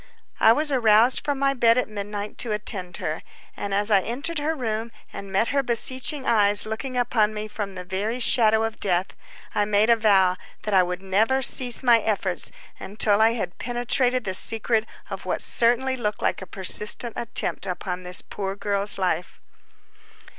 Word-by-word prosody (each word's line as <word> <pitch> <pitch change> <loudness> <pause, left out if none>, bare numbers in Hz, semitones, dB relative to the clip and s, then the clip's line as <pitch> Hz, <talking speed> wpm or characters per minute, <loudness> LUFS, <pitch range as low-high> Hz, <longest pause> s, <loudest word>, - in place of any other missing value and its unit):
I 225 - +6
was 295 +5 +1
aroused 235 -1 +3
from 285 -1 -2
my 275 0 +1
bed 235 -2 +3
at 250 - 0
midnight 205 0 -7
to 235 - 0
attend 190 -4 -4
her, 155 +1 -4 0.3
and 200 - -6
as 205 +2 -1
I 200 -2 +5
entered 280 - -4
her 310 +2 -2
room 225 -4 -4 0.2
and 200 -1 -9
met 195 +4 +1
her 280 +1 +1
beseeching 260 +3 +1
eyes 205 -2 +4
looking 235 +4 -5
upon 220 -3 0
me 210 0 -5
from 205 -2 -6
the 180 -1 -8
very 205 +6 -3
shadow 220 -2 +3
of 225 -1 -4
death, 185 -1 -1 0.4
I 205 - 0
made 210 +2 +2
a - - +6
vow 195 -5 +2 0.3
that 210 - -3
I 190 - +5
would 180 +1 -4
never 220 +8 +1
cease 250 0 +3
my 240 -2 +5
efforts 205 -4 -1 0.5
till 210 -1 +3
I 225 +1 +4
had 185 -7 -5
penetrated 245 +1 -1
the 190 - -3
secret 225 +3 +2 0.2
of - - -7
what - - -2
certainly 245 +3 +1
looked 215 -4 -4
like - - 0
a 190 - -9
persistent 210 +5 +2
attempt 230 -4 -2
upon 180 0 -5
this 180 0 -1
poor 195 -1 -5
girl's 200 0 +1
life. 180 -2 -2
215 Hz, 180 wpm, -23 LUFS, 200-240 Hz, 0.5 s, I